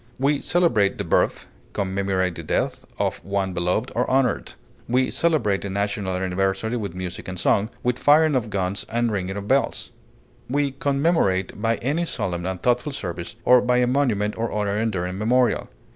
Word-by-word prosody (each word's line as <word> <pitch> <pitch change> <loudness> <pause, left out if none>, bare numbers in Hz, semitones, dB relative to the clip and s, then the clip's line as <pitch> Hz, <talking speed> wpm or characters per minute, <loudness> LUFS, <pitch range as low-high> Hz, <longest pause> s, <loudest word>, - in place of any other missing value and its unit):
We 140 +1 +2
celebrate 120 - +2
the - - -2
birth, - - +1 0.3
commemorate 95 -2 0
the 85 - -7
death 80 - -2
of - - -2
one 100 -1 -1
beloved 90 +8 -1
or 125 - 0
honored. 130 -1 +1 0.3
We 130 +2 +2
celebrate 130 -13 +1
a 100 - -4
national 100 -1 -1
anniversary 95 +4 -1
with 100 -6 -5
music 90 -1 -6
and 95 -1 -5
song, 105 +2 +2
with 125 0 0
firing 150 0 +5
of 120 -4 0
guns 95 -1 -2
and 120 0 0
ringing 95 -1 -2
of 100 0 -6
bells; 135 +4 0 0.6
we 140 +1 +1
commemorate 135 - +1
by 115 0 +2
any 150 +7 0
solemn 90 - -3
and 95 -1 -3
thoughtful 125 +4 +1
service, 85 -7 -5
or 125 -1 +7
by 125 0 +2
a 125 - +4
monument 120 -6 +1
or 115 0 -1
other 105 -1 -1
enduring 95 -4 -1
memorial. 120 +2 +2
105 Hz, 170 wpm, -23 LUFS, 95-125 Hz, 0.6 s, or